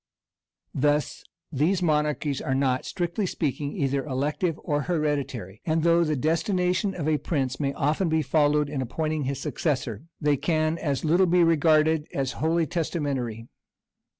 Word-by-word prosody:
Thus 145 +2 0 0.3
these 170 +6 +1
monarchies 150 -3 0
are 130 - -1
not, 130 -2 +1
strictly 180 +2 -2
speaking, 145 -3 -2
either 135 -1 0
elective 150 +4 -1
or 145 0 0
hereditary; 140 - -2
and 160 -1 0
though 170 0 +4
the 155 -2 0
destination 180 - 0
of 155 -4 -3
a 155 -1 +2
prince 135 -5 -2
may 140 -2 0
often 155 +5 0
be 160 -1 +1
followed 150 +1 +2
in 140 -2 -3
appointing 155 +4 -2
his 135 +1 -2
successor, 130 - -2
they 145 -1 +2
can 155 +2 0
as 145 -1 -2
little 175 +4 +4
be 175 0 +4
regarded 160 -1 +3
as 135 -2 -1
wholly 165 +1 +2
testamentary. 140 -9 -3
150 Hz, 150 wpm, -26 LUFS, 140-165 Hz, 0.3 s, though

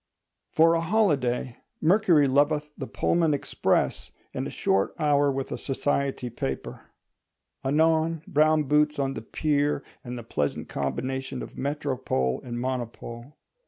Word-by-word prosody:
For 165 +1 +5
a 165 - +1
holiday, 145 - +1 0.2
Mercury 165 -4 +4
loveth 150 +2 +2
the 135 - -6
Pullman 155 +9 +1
Express, 140 - 0 0.2
and - - -3
a - - -5
short 95 0 0
hour 145 -2 +3
with 135 0 -4
a - - -3
society 140 -1 -1
paper; 65 - -5 0.8
anon, 160 +3 +2
brown 155 -3 +3
boots 150 +2 +2
on 135 -1 0
the 110 - -6
pier, 145 +3 0 0.2
and 125 0 -6
the 120 - -7
pleasant 75 -10 -2
combination 130 - -3
of - - -9
Métropole 130 - -1
and 120 -1 -5
Monopole. 120 0 -5
140 Hz, 130 wpm, -26 LUFS, 125-155 Hz, 0.8 s, For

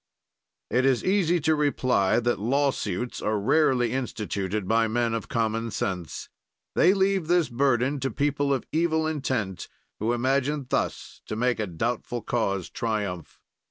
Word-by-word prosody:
It 125 - +3
is 130 -3 +2
easy 185 -3 +2
to 160 +2 +3
reply 130 -9 +2
that 120 -3 0
lawsuits 125 -3 -1
are 105 0 0
rarely 125 0 +3
instituted 105 -6 -3
by 115 +1 +3
men 115 +1 0
of 115 -2 -3
common 115 0 -1
sense; 90 -7 -4 0.5
they 185 +4 +4
leave 195 -3 +1
this 175 -2 +3
burden 135 +2 +1
to 135 0 -1
people 145 0 0
of 135 -3 0
evil 160 0 +1
intent, 130 - -2 0.3
who 110 +3 0
imagine 135 +3 0
thus - - -2
to - - -3
make 125 +2 +1
a 110 - -1
doubtful 115 +6 -3
cause 100 -6 -1
triumph. 100 -7 -3
120 Hz, 145 wpm, -26 LUFS, 110-145 Hz, 0.5 s, they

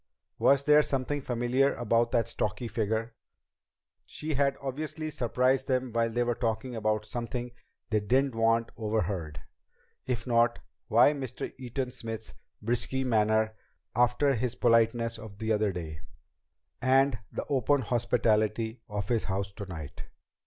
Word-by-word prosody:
Was 140 0 +4
there 150 +1 +6
something 140 0 -1
familiar 125 +2 +1
about 115 0 +2
that 115 -2 +1
stocky 110 +4 -2
figure? 110 +1 -1 0.9
She 155 +1 -4
had 140 0 +1
obviously 155 +3 -4
surprised 130 0 +1
them 130 -1 0
while 115 0 +2
they 120 +2 0
were 120 0 +1
talking 120 +1 -2
about 110 -1 0
something 120 +2 -4 0.4
they 110 - +3
didn't 130 +6 +1
want 115 0 +2
overheard. 100 -9 -2 0.6
If 120 -2 -2
not, 120 -1 +3 0.3
why 120 +6 +5
Mr. 130 -4 -5
Eaton 130 0 -3
Smith's 115 -3 -6 0.3
brusque 120 +4 0
manner 110 -2 +2 0.4
after 125 +4 +3
his 125 0 -1
politeness 115 -1 +2
of 110 -2 -10
the 110 +1 -2
other 105 -1 +1
day, 80 -4 -6 0.8
and 130 -1 +3
the - - -4
open 140 +1 +2
hospitality 110 -1 +1
of 100 -1 -3
his 115 -3 +1
house 100 +1 -2
tonight? 85 -8 -8
115 Hz, 135 wpm, -29 LUFS, 110-130 Hz, 0.9 s, there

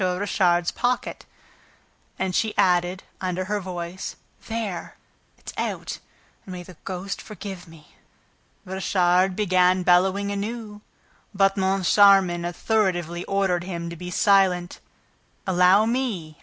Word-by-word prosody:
Richard's 180 -2 +1
pocket." 245 0 -2 0.9
And 190 -1 -2
she 220 +3 0
added, 180 +1 +2 0.2
under 185 0 -2
her 205 +2 -1
voice, 180 -1 -6 0.3
"There! 220 -5 -4 0.4
It's - - -10
out!... - - -3 0.4
And 185 - -9
may 180 -1 -7
the 180 0 -13
ghost 190 +1 -5
forgive 195 -4 -8
me!" 160 -2 -17 0.7
Richard 185 0 +1
began 185 -2 +3
bellowing 190 +3 +3
anew, 210 +1 -5 0.5
but 195 0 +3
Moncharmin 190 -2 +4
authoritatively 175 -2 -1
ordered 190 -3 0
him 170 -2 -5
to - - -6
be 180 +2 -7
silent. 185 -1 +2 0.7
"Allow 185 +3 +4
me! 220 - -2
185 Hz, 115 wpm, -24 LUFS, 175-200 Hz, 0.9 s, Moncharmin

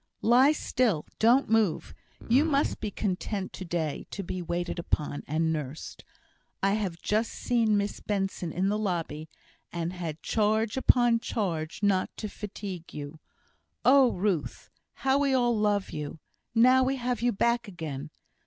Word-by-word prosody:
"Lie 255 +5 +6
still! 240 - 0
Don't 240 +5 +4
move! 220 -6 +1 0.3
You 255 +5 +5
must 290 -3 +1
be 215 - -2
content 195 0 -3
to - - -6
day 165 -4 -3
to 200 - -5
be 180 0 -4
waited 175 +1 -3
upon, 150 -3 -2
and 160 +2 +1
nursed! 150 -1 -6 0.6
I 195 - +4
have 200 -5 -2
just 220 +2 +1
seen 225 -4 +1
Miss 205 0 -2
Benson 195 -4 -2
in 185 +4 0
the 210 +1 0
lobby, 165 -6 -3 0.4
and 170 0 -3
had 165 -4 -6
charge 220 0 +1
upon 240 -3 +4
charge 175 -6 -3
not 195 -2 +2
to 215 - -4
fatigue 200 -4 -7
you. 145 +1 -7 0.7
Oh, 260 -2 +6
Ruth! 180 -5 -2 0.3
how 270 +1 +4
we 280 -2 +2
all 240 -2 +2
love 210 -2 +1
you, 150 +1 -5 0.4
now 255 +3 +6
we 265 +1 +1
have 245 -3 -2
you 245 0 +3
back 235 +3 +1
again! 155 -6 -6
205 Hz, 155 wpm, -28 LUFS, 170-235 Hz, 0.7 s, Lie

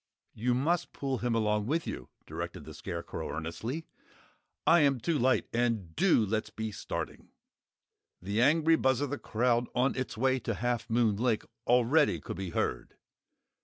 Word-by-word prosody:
"You 120 +3 0
must 160 +7 0
pull 135 -3 -2
him 120 -1 0
along 105 -1 +1
with 160 +4 0
you," - - -6 0.2
directed - - -6
the - - -9
Scarecrow, 85 0 -5
earnestly. 110 - -4 0.8
"I 170 - +6
am 140 -4 +3
too 150 +7 0
light. 130 +2 +3
And 115 -8 0
DO 165 - +4
let's 110 +2 -1
be 110 0 -4
starting!" 100 - -5 0.9
The 100 +5 -1
angry 160 +4 +4
buzz 130 -2 +2
of 145 -2 -1
the 145 - -3
crowd 120 +1 +1
on 125 +2 +2
its 130 -3 -4
way 130 +2 +2
to 115 -2 -3
Half 120 0 -2
Moon 115 -3 +2
Lake, 115 -1 +1 0.2
already 125 - +4
could 75 - -7
be 95 -1 -4
heard. - - -2
120 Hz, 165 wpm, -30 LUFS, 110-135 Hz, 0.9 s, I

